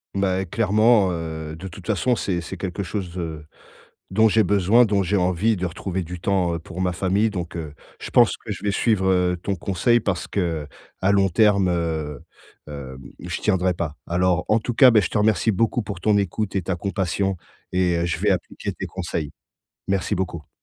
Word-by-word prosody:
Beh, 95 -1 0
clairement, 110 -2 +3
heu, 80 -2 -5
de 90 +4 -8
toute 90 0 -11
façon, 110 +3 +1
c'est 90 -6 -2
c'est 80 - -7
quelque 95 +1 -4
chose, 95 -2 -5
heu, 80 -3 -5 0.7
dont 110 +3 +4
j'ai 110 +1 +4
besoin, 105 +4 +4
dont 100 -1 +1
j'ai 95 +3 0
envie, 95 +4 +2
de 90 0 -2
retrouver 90 +2 -4
du 90 +1 -7
temps, 90 -2 +1
heu, - - -2
pour 85 +2 -8
ma 90 -1 +1
famille, 95 +5 +1
donc 90 -4 -5
heu, 75 -3 -6 0.3
je - - -7
pense - - +5
que - - -4
je - - -8
vais 105 - +2
suivre, 100 -1 +1
heu, 90 -1 +2
ton 100 - -1
conseil 100 +7 +2
parce 100 -5 -2
qu'à 80 -6 -2 0.3
long 100 0 +3
terme, 100 0 +3
heu, 80 -5 -2 0.5
hem, 65 -3 -8 0.2
je 90 +1 -4
tiendrai 95 -3 +1
pas. 80 -3 -4
Alors, 90 +1 +1
en 110 +1 +3
tout 120 - -3
cas, 125 +2 +7
beh, 110 -3 +5
je - - -1
te - - 0
remercie 110 +1 +3
beaucoup 115 +4 +1
pour 100 -4 -6
ton 105 +1 +3
écoute 100 +1 -1
et 95 - +1
ta 90 +1 -2
compassion 95 0 -1 0.4
et 90 -1 +2
heu, 85 - 0
je 85 - -2
vais - - +1
appliquer - - -2
tes - - -6
conseils. 85 -4 -4 0.6
Merci 95 -1 0
beaucoup! 85 -5 -4
95 Hz, 200 wpm, -23 LUFS, 85-100 Hz, 0.7 s, cas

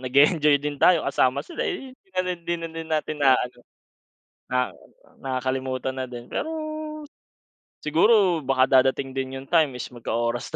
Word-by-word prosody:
nag-e-enjoy 145 +3 +4
din 145 0 -5
tayo 175 -3 +5
kasama 135 -1 +1
sila 340 - -7
eh 270 -9 -5
'di 255 - -26
na - - +4
din - - -5
hindi 170 - +1
na - - -3
din 160 - -8
natin 155 -1 -1
na-aano. 125 -3 +3 0.9
Na 125 - +1 0.7
nakakalimutan 130 0 -2
na 130 - -3
din 120 -1 -8
pero, 315 - -3 1.3
siguro 180 +3 +4
baka 135 -3 +2 0.2
darating 135 +1 0
din 130 0 -4
yung 135 - -6
time 155 -6 +3
is 125 - -6
magka-oras 120 0 -2
135 Hz, 155 wpm, -24 LUFS, 130-160 Hz, 1.3 s, tayo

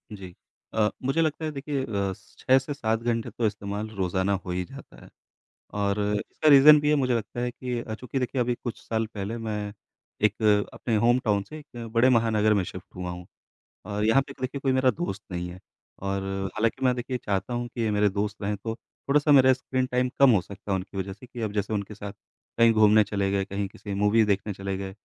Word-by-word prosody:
जी। 95 -3 -10 0.4
अ, 110 -1 +3
मुझे 135 +5 +1
लगता 160 0 -1
है 155 - -2
देखिए 140 -1 -3
अ, - - -12 0.2
स - - -21
6 130 - +4
से 140 +3 -5
7 110 -4 0
घंटे 115 -1 -1
तो 120 - -2
इस्तेमाल 105 +1 -4
रोजाना 95 +1 0
हो 90 - -4
ही 90 +1 -1
जाता - - -13
है, - - -15 0.7
और 100 0 0 0.3
इसका 155 - +1
रीज़न 145 +1 +9
भी 150 - 0
है। - - +5
मुझे 130 -3 +1
लगता 115 +1 -3
है 125 0 -1
कि 125 0 -4
अ, 110 - -5
चूँकि 125 +3 -4
देखिए 125 +1 -1
अभी 120 0 +1
कुछ 120 - -4
साल 110 0 0
पहले 105 +3 -4
मैं 105 -2 -4 0.5
एक 105 +2 +2 0.3
अपने 115 -3 -1
होमटाउन 115 -3 +2
से 155 - -8
एक 120 -6 -9
बड़े 120 +2 +5
महानगर 110 -3 +3
में 100 - +2
शिफ्ट 90 +1 -8
हुआ 90 -1 -4
हूँ। 90 0 -8 0.6
अ, 105 0 -3
यहाँ 115 +6 +4
पे 135 - -11
देखिए 130 +2 -3
कोई 135 -1 +1
मेरा 130 0 +4
दोस्त 125 - -4
नहीं 90 0 -3
है। 90 +1 -10 0.4
और 100 0 -1 0.3
हालाँकि 115 +4 0
मैं 125 -1 +4
देखिए 125 +1 -3
चाहता 100 +4 -1
हूँ 120 0 -2
कि 115 -2 -2
मेरे 105 0 +3
दोस्त 105 +1 -3
रहें 105 +1 -1
तो 110 +3 -4
थोड़ा-सा 145 +5 0
मेरा 130 -2 +7
स्क्रीन 130 0 -1
टाइम 125 0 0
कम 140 -2 +7
हो 105 - +4
सकता 100 +2 -10
है - - +2
उनकी 95 +1 -7
वजह 95 0 -3
से, 105 +6 -13
कि 125 -1 -9
अब 110 -2 -2
जैसे 105 +1 -2
उनके 105 0 -3
साथ 100 -1 -7 0.5
कहीं 115 -1 +6
घूमने 110 0 +6
चले 100 -1 -1
गए, 100 0 +1
कहीं 100 0 -3
किसी 100 +1 -7
मूवी 105 +3 +3
देखने 100 0 0
चले 95 0 -4
गए 95 -1 -5
110 Hz, 225 wpm, -26 LUFS, 100-125 Hz, 0.7 s, रीज़न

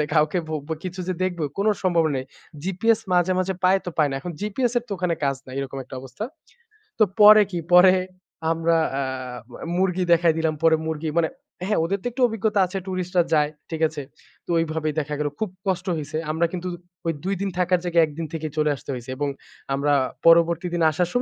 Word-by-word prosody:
মানে 150 - +2
কাউকে 155 +3 +3
ভোব্ব 150 -2 -4 0.2
কিছু 185 +1 -5
যে 185 - 0
দেখব 180 -2 -1 0.2
কোন 200 - +1 0.2
সম্ভাবনা 165 -5 +2
নেই। 130 - -4 0.4
জিপিএস 215 +5 +1
মাঝে, 180 +1 +3
মাঝে, 185 +1 0
পায় 190 +1 +5
তো 180 - -2
পায় 150 - +4
না। 135 - -3
এখন 175 - -5
জিপিএস 225 +4 -1
এর - - -9
তো 205 - -4
ওখানে 180 -2 0
কাজ 135 -1 +1
নাই। 130 - -9
এরকম 135 0 -5
একটা 130 - -10
অবস্থা। 135 +11 -7 0.7
তো 215 - +7 0.2
পরে 210 0 +10
কি? 175 - -1 0.2
পরে 185 +1 +8 0.6
আমরা 165 0 +2 0.2
আ - - 0 0.7
মুরগি 185 -1 +1
দেখায় 165 -1 +4
দিলাম, 160 -1 +1
পরে 160 -1 +5
মুরগি 160 0 -3
মানে 160 -1 +2 0.4
হ্যা, 210 - +2
ওদের 195 +4 -1
তো - - -8
একটু 255 - -2
অভিজ্ঞতা 220 -2 0
আছে 190 +2 -4
ট্যুরিস্টরা 185 -1 0
যায়, 150 -1 +3 0.2
ঠিক 160 - -4
আছে? 155 -2 -6 0.4
তো - - -8
ওইভাবেই 155 -2 -1
দেখা 150 0 -3
গেল। 150 - +1
খুব 215 - -1 0.2
কষ্ট 185 0 -1
হইছে। 150 +1 -5 0.2
আমরা 165 +2 +2
কিন্তু 180 0 -4 0.4
ওই 165 - +2
২ 195 +1 0
দিন 200 - -1
থাকার 180 0 +2
জায়গায় 170 -2 +4
১ 150 - -10
দিন 165 - -2
থেকেই 155 -2 -4
চলে 150 -1 +3
আসতে 140 - -9
হইছে 125 0 -7
এবং 145 0 0 0.5
আমরা 145 +1 +1 0.3
পরবর্তী 170 +1 +5
দিন 170 - +1
আসার 175 +3 0
170 Hz, 205 wpm, -23 LUFS, 155-185 Hz, 0.7 s, পরে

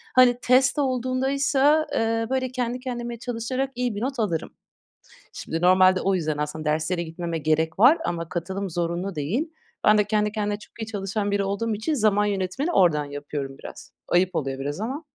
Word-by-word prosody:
Hani, 250 -1 +6
test 255 +2 +4
olduğundaysa, 270 +3 +2
eee, 225 0 0
böyle, 260 -1 -1
kendi 250 -1 -2
kendime 240 -2 -5
çalışarak 250 +3 -3
iyi 245 -3 -1
bir 205 - -4
not 265 +1 -3
alırım. 175 -8 -2 0.8
Şimdi 165 - -4
normalde 185 +1 +5
o 195 - +1
yüzden 155 -4 -1
aslında 150 +1 -3
derslere 160 +3 0
gitmeme 170 0 -4
gerek 160 +2 0
var 260 +10 +7
ama 170 -1 -3
katılım 190 +3 -4
zorunlu 175 +3 -2
değil. 200 - -1 0.4
Ben 215 0 +6
de 210 - +4
kendi 210 0 0
kendine 210 -1 -2
çok 210 - -15
iyi - - -3
çalışan 205 -1 -2
biri 200 0 +1
olduğum 200 +3 -1
için 220 +9 -1
zaman 210 -5 +3
yönetimini 205 - -1
oradan 165 - +3
yapıyorum 145 -1 -6
biraz. - - -11 0.2
Ayıp 185 +1 +2
oluyor 135 -4 -2
biraz 145 +5 -4
ama. 265 +8 -4
205 Hz, 175 wpm, -24 LUFS, 170-250 Hz, 0.8 s, var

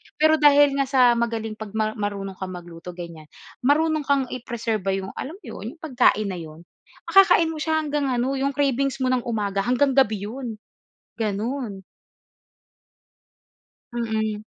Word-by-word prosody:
Pero, 315 0 +4
dahil 285 -1 +5
nga 275 - +1
sa 255 -3 +5
magaling 225 -2 -2
'pag 215 0 -8
mar 215 0 +1
marunong 200 -2 -4
kang 185 -1 -5
magluto 175 0 -10
ganyan, 170 -3 -9 0.3
marunong 300 +3 +2
kang 280 -1 +3
i-preserba 225 -5 -2
yung, 190 0 -4
alam 310 +6 -6
mo 405 - -20
yun, - - -7
yung - - -31
pagkain 240 -8 +2
na 180 - -5
yun. 160 +1 -10 0.4
Makakain 375 -4 +5
mo 310 - -6
siya 315 0 0
hanggang 290 -1 -1
ano, 255 +1 0
yung 275 0 -1
cravings 275 -1 +1
mo - - +2
ng 255 -1 +2
umaga 205 -4 -1
hanggang 250 +6 +2
gabi 220 -7 +2
yun, 235 +1 -5 0.6
gano'n. 215 -1 -3 2.1
Mhm. 220 -2 -2
235 Hz, 150 wpm, -23 LUFS, 205-275 Hz, 2.1 s, dahil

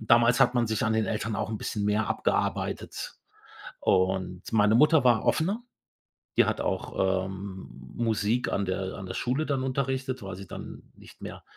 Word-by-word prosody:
damals 115 +3 +4
hat 125 -1 +5
man 120 -1 +2
sich 110 +3 0
an 110 - +2
den 110 -2 +1
Eltern 110 +1 -2
auch - - -2
'n 110 - -3
bisschen 105 0 -3
mehr 105 +1 +1
abgearbeitet. - - -2 0.6
Und 95 -1 +1
meine 105 0 +4
Mutter 150 +2 +5
war 120 -3 +4
offener. 195 +8 +1 0.8
Die - - +6
hat - - -1
auch, 95 -1 0
ähm, 95 0 -7 0.3
Musik 115 +1 +1
an 100 - +1
der 95 0 -2
an 95 - -7
der 95 - -5
Schule 130 +9 -1
dann 135 -2 0
unterrichtet, 130 -1 -2
weil 95 -2 -6
sie 95 0 -9
dann - - -8
nicht - - -16
mehr, - - -8
110 Hz, 175 wpm, -28 LUFS, 95-125 Hz, 0.8 s, Die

